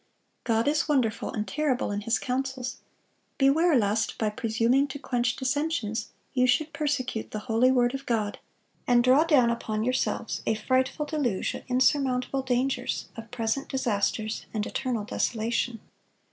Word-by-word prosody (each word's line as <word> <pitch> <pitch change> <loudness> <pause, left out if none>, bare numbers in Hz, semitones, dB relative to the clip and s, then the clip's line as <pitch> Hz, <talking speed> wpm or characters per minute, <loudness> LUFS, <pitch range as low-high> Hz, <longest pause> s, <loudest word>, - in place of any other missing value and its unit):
God 230 +1 +1
is 305 +2 +1
wonderful 250 -7 +1
and 210 -1 -3
terrible 275 -6 0
in 205 0 -2
His 230 +3 +1
counsels; 260 0 -3 0.6
beware 300 +4 +4
lest, 215 -1 +1
by 215 -2 0
presuming 230 +5 +1
to 280 - -6
quench 245 -3 -1
dissensions, 265 -4 -1 0.2
you 255 -1 +3
should 295 +5 +1
persecute 260 -6 -2
the - - -5
holy 245 +2 +3
word 245 -1 +3
of 270 0 -6
God, 215 -3 -1 0.5
and 240 -1 +5
draw 260 +5 +5
down 265 -8 +4
upon 215 -2 -2
yourselves 255 +2 -1
a 220 - +2
frightful 260 +6 0
deluge 285 - -1
of - - -6
insurmountable 260 0 +2
dangers, 255 0 -1
of 225 0 -9
present 245 +3 -2
disasters, 220 -3 -1
and 210 -1 0
eternal 250 -5 -2
desolation.... 225 +2 -1
250 Hz, 145 wpm, -27 LUFS, 225-270 Hz, 0.6 s, and